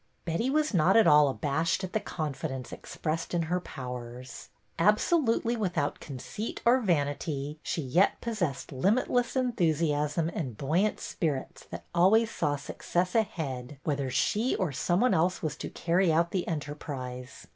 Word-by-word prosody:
Betty 170 Hz, +10 st, 0 dB
was 305 Hz, -1 st, +1 dB
not 180 Hz, +4 st, +4 dB
at 225 Hz, -, +6 dB
all 150 Hz, -1 st, +7 dB
abashed 155 Hz, +6 st, 0 dB
at 185 Hz, -, -5 dB
the 220 Hz, -, +2 dB
confidence 150 Hz, -8 st, -4 dB
expressed 165 Hz, +2 st, -4 dB
in 170 Hz, -, +1 dB
her 175 Hz, +3 st, 0 dB
powers. 125 Hz, -4 st, -8 dB, 0.3 s
Absolutely 230 Hz, -, +3 dB
without 180 Hz, -9 st, -1 dB
conceit 150 Hz, -, -6 dB
or 245 Hz, +2 st, +6 dB
vanity, 145 Hz, -, -1 dB
she 160 Hz, -, -2 dB
yet 170 Hz, +10 st, +2 dB
possessed 185 Hz, -, -3 dB
limitless 230 Hz, -, +1 dB
en 255 Hz, -1 st, +1 dB
thusiasm 160 Hz, -4 st, +1 dB
and 130 Hz, -9 st, -4 dB
buoyant 175 Hz, +10 st, +1 dB
spirits 150 Hz, -6 st, -3 dB
that -, -, -7 dB
always 215 Hz, +6 st, +4 dB
saw 145 Hz, -3 st, 0 dB
success 175 Hz, +5 st, -2 dB
ahead 145 Hz, -, -2 dB
whether 140 Hz, -3 st, -1 dB
she 210 Hz, -, +1 dB
or 185 Hz, -6 st, -1 dB
someone 180 Hz, -, +2 dB
else 180 Hz, +3 st, +1 dB
was 150 Hz, -2 st, -1 dB
to -, -, -5 dB
carry 175 Hz, +1 st, +1 dB
out 170 Hz, +2 st, +2 dB
the 185 Hz, -2 st, -1 dB
enterprise. 140 Hz, -5 st, -5 dB
165 Hz, 145 wpm, -29 LUFS, 145-200 Hz, 0.3 s, all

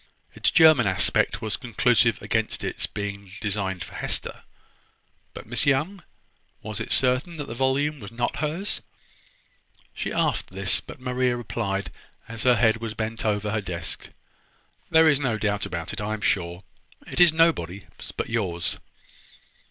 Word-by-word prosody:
Its -, -, +1 dB
German 155 Hz, -, +6 dB
aspect 95 Hz, +3 st, +2 dB
was 110 Hz, -, -2 dB
conclusive 120 Hz, -2 st, +2 dB
against 110 Hz, -1 st, -1 dB
its -, -, -1 dB
being 100 Hz, -2 st, -6 dB
designed 95 Hz, -4 st, -2 dB
for -, -, -11 dB
Hester: -, -, -2 dB, 0.9 s
but -, -, -8 dB
Miss -, -, +1 dB
Young, 155 Hz, +8 st, +1 dB, 0.6 s
was 110 Hz, 0 st, -4 dB
it 110 Hz, -, -5 dB
certain 130 Hz, +6 st, +1 dB
that 145 Hz, -, -4 dB
the 115 Hz, -, -6 dB
volume 135 Hz, +4 st, 0 dB
was 100 Hz, +1 st, -9 dB
not 120 Hz, +1 st, -2 dB
hers? 160 Hz, +7 st, -2 dB, 1.1 s
She -, -, -4 dB
asked -, -, 0 dB
this; 95 Hz, 0 st, +2 dB
but -, -, -11 dB
Maria 125 Hz, -1 st, 0 dB
replied, 100 Hz, -4 st, -3 dB, 0.4 s
as 115 Hz, -1 st, -6 dB
her 125 Hz, -1 st, +6 dB
head 115 Hz, -2 st, +3 dB
was 115 Hz, -1 st, -5 dB
bent 110 Hz, +1 st, -3 dB
over 105 Hz, -1 st, 0 dB
her 110 Hz, 0 st, 0 dB
desk: 90 Hz, -3 st, -4 dB, 0.8 s
"There 160 Hz, 0 st, +6 dB
is 145 Hz, -3 st, +4 dB
no 125 Hz, -6 st, 0 dB
doubt 105 Hz, -2 st, -1 dB
about 85 Hz, 0 st, -4 dB
it. -, -, -5 dB
I 105 Hz, +1 st, -2 dB
am 110 Hz, -, -9 dB
sure. 90 Hz, -2 st, 0 dB, 0.4 s
It -, -, -4 dB
is 175 Hz, -2 st, +8 dB
nobody's 100 Hz, -, +2 dB, 0.3 s
but -, -, -2 dB
yours." 95 Hz, -7 st, -2 dB
115 Hz, 155 wpm, -25 LUFS, 100-130 Hz, 1.1 s, is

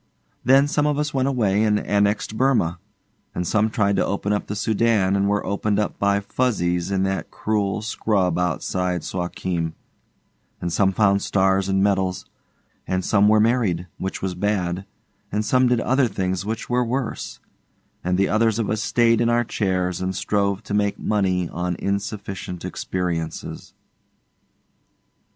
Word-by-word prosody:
Then 135 Hz, +2 st, +5 dB
some 150 Hz, 0 st, +1 dB
of 145 Hz, -1 st, +1 dB
us 150 Hz, 0 st, -1 dB
went 135 Hz, -1 st, +1 dB
away 105 Hz, -7 st, +1 dB
and 105 Hz, -1 st, +2 dB
annexed 105 Hz, +1 st, 0 dB
Burma, 110 Hz, -10 st, +1 dB, 0.6 s
and 90 Hz, -, -2 dB
some 110 Hz, +4 st, +2 dB
tried 100 Hz, -3 st, +1 dB
to -, -, +3 dB
open 100 Hz, +1 st, -1 dB
up 105 Hz, -, -2 dB
the 105 Hz, -, -4 dB
Soudan 105 Hz, -2 st, +2 dB
and 100 Hz, 0 st, +1 dB
were 105 Hz, 0 st, 0 dB
opened 100 Hz, +1 st, 0 dB
up 105 Hz, -, -1 dB
by 100 Hz, 0 st, +2 dB
Fuzzies 95 Hz, -6 st, 0 dB
in 95 Hz, -1 st, +1 dB
that 95 Hz, 0 st, -2 dB
cruel 105 Hz, -1 st, -1 dB
scrub 95 Hz, -5 st, 0 dB
outside 90 Hz, 0 st, -1 dB
Suakim, 90 Hz, -2 st, -3 dB, 0.8 s
and 85 Hz, -1 st, -3 dB
some 95 Hz, +1 st, +3 dB
found 100 Hz, -1 st, +3 dB
stars 95 Hz, 0 st, +1 dB
and 95 Hz, 0 st, +2 dB
medals, 95 Hz, -2 st, 0 dB, 0.6 s
and 95 Hz, -1 st, -1 dB
some 105 Hz, -1 st, +4 dB
were 110 Hz, 0 st, +5 dB
married, 105 Hz, -6 st, +2 dB
which 95 Hz, 0 st, -4 dB
was 95 Hz, -1 st, -1 dB
bad, 90 Hz, -1 st, -1 dB, 0.5 s
and 105 Hz, +1 st, -1 dB
some 130 Hz, +2 st, +3 dB
did 125 Hz, -1 st, +2 dB
other 130 Hz, +2 st, +2 dB
things 95 Hz, -2 st, -2 dB
which 110 Hz, +1 st, -3 dB
were 125 Hz, 0 st, +1 dB
worse, 125 Hz, 0 st, -3 dB, 0.6 s
and 90 Hz, +1 st, 0 dB
the 100 Hz, -, +3 dB
others 110 Hz, 0 st, +2 dB
of 115 Hz, -3 st, -1 dB
us 110 Hz, 0 st, -1 dB
stayed 115 Hz, +1 st, +3 dB
in 120 Hz, -, +2 dB
our 120 Hz, 0 st, +3 dB
chains 90 Hz, -5 st, -1 dB
and 95 Hz, 0 st, -2 dB
strove 100 Hz, 0 st, 0 dB
to 100 Hz, -, -6 dB
make 105 Hz, -1 st, +1 dB
money 95 Hz, -4 st, 0 dB
on 90 Hz, +1 st, -2 dB
insufficient 100 Hz, -3 st, -4 dB
experiences. 85 Hz, -3 st, -4 dB
100 Hz, 160 wpm, -22 LUFS, 95-110 Hz, 0.8 s, Then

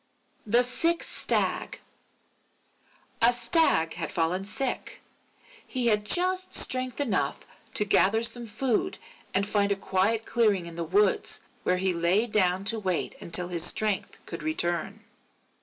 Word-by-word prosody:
_ -, -, -9 dB
THE 240 Hz, +2 st, +5 dB
SICK 330 Hz, +7 st, +2 dB
STAG -, -, 0 dB, 1.4 s
A 235 Hz, +1 st, +5 dB
Stag 240 Hz, -, +2 dB
had 165 Hz, -1 st, -5 dB
fallen 180 Hz, +2 st, -1 dB
sick. 255 Hz, +5 st, -2 dB, 0.7 s
He 255 Hz, -2 st, -2 dB
had 210 Hz, -2 st, +2 dB
just 370 Hz, -, +2 dB
strength 255 Hz, 0 st, +2 dB
enough 200 Hz, -, -1 dB, 0.3 s
to 210 Hz, -, 0 dB
gather 210 Hz, +2 st, +2 dB
some 235 Hz, 0 st, 0 dB
food 255 Hz, -, -2 dB, 0.3 s
and 195 Hz, +1 st, -1 dB
find 205 Hz, -1 st, 0 dB
a -, -, +2 dB
quiet 195 Hz, +4 st, -1 dB
clearing 210 Hz, -6 st, +1 dB
in 170 Hz, -, -9 dB
the 170 Hz, -, -4 dB
woods, 195 Hz, +4 st, +1 dB, 0.2 s
where 180 Hz, -, 0 dB
he 185 Hz, 0 st, 0 dB
lay 175 Hz, +6 st, +1 dB
down 190 Hz, -4 st, 0 dB
to 220 Hz, +2 st, 0 dB
wait 185 Hz, -4 st, -2 dB
until 175 Hz, +1 st, -1 dB
his 170 Hz, -2 st, +1 dB
strength 210 Hz, +2 st, +1 dB
should 170 Hz, -1 st, -7 dB
return. 175 Hz, +6 st, -3 dB
205 Hz, 140 wpm, -26 LUFS, 180-235 Hz, 1.4 s, THE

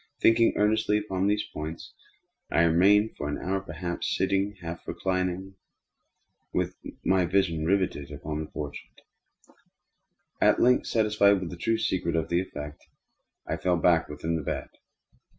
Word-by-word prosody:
Thinking 115 Hz, 0 st, +5 dB
earnestly 105 Hz, 0 st, +2 dB
upon 95 Hz, -2 st, -1 dB
these 105 Hz, +1 st, +1 dB
points, 80 Hz, +2 st, -6 dB, 0.6 s
I 85 Hz, -, +3 dB
remained, 100 Hz, +6 st, +4 dB
for 75 Hz, -, -4 dB
an 75 Hz, -, -2 dB
hour 95 Hz, +2 st, -1 dB
perhaps, 85 Hz, 0 st, -4 dB
half -, -, 0 dB
sitting, 100 Hz, +1 st, 0 dB
half 85 Hz, -1 st, -7 dB
reclining, 95 Hz, 0 st, -2 dB, 0.9 s
with -, -, -1 dB, 0.3 s
my 95 Hz, -1 st, +3 dB
vision 85 Hz, -3 st, +1 dB
riveted 90 Hz, -7 st, 0 dB
upon 75 Hz, +1 st, -5 dB
the 80 Hz, -, -5 dB
portrait. 75 Hz, -1 st, -8 dB, 1.4 s
At -, -, +5 dB
length, 125 Hz, +1 st, +4 dB
satisfied 105 Hz, -3 st, +3 dB
with 90 Hz, -3 st, -5 dB
the -, -, -6 dB
true 115 Hz, +6 st, 0 dB
secret 85 Hz, -5 st, -1 dB
of 80 Hz, +1 st, -1 dB
its 90 Hz, +2 st, +1 dB
effect, 75 Hz, 0 st, -8 dB, 0.6 s
I -, -, -2 dB
fell 90 Hz, -1 st, +1 dB
back 85 Hz, 0 st, +3 dB
within 80 Hz, +3 st, -2 dB
the -, -, -3 dB
bed. -, -, -4 dB
90 Hz, 150 wpm, -27 LUFS, 80-100 Hz, 1.4 s, Thinking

